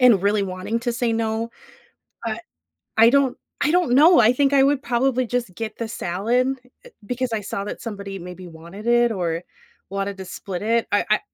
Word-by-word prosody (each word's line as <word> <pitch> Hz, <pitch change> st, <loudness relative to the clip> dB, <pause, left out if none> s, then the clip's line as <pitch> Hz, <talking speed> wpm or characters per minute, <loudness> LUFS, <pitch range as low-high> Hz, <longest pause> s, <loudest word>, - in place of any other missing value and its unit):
and 240 Hz, -7 st, +6 dB
really 205 Hz, 0 st, +2 dB
wanting 185 Hz, +4 st, -3 dB
to 240 Hz, 0 st, -1 dB
say 235 Hz, -1 st, 0 dB
"no," 225 Hz, 0 st, -1 dB, 0.8 s
uh, 220 Hz, -1 st, -2 dB, 0.6 s
I 225 Hz, +1 st, +8 dB
don't 275 Hz, -2 st, +3 dB, 0.2 s
I 290 Hz, -, +3 dB
don't 355 Hz, -8 st, +2 dB
know, 320 Hz, +7 st, +7 dB
I 235 Hz, +1 st, +6 dB
think 280 Hz, +1 st, +2 dB
I 270 Hz, -, +6 dB
would 275 Hz, 0 st, +2 dB
probably 255 Hz, +1 st, +1 dB
just 240 Hz, -6 st, -2 dB
get 225 Hz, +1 st, -5 dB
the 230 Hz, -, -3 dB
salad, 235 Hz, +7 st, 0 dB, 0.2 s
eh, -, -, -13 dB, 0.2 s
because 250 Hz, +2 st, -2 dB
I 220 Hz, -, -1 dB
saw 200 Hz, 0 st, -4 dB
that -, -, -5 dB
somebody 200 Hz, -3 st, -6 dB
maybe 180 Hz, +1 st, -9 dB
wanted 170 Hz, +6 st, -10 dB
it 240 Hz, 0 st, +4 dB
or 170 Hz, -4 st, -2 dB, 0.5 s
wanted 195 Hz, 0 st, -3 dB
to 190 Hz, -, -7 dB
split 185 Hz, +1 st, -6 dB
it. 230 Hz, +1 st, +1 dB
I 205 Hz, -, +2 dB
I 215 Hz, -, +5 dB
225 Hz, 195 wpm, -22 LUFS, 195-250 Hz, 0.8 s, I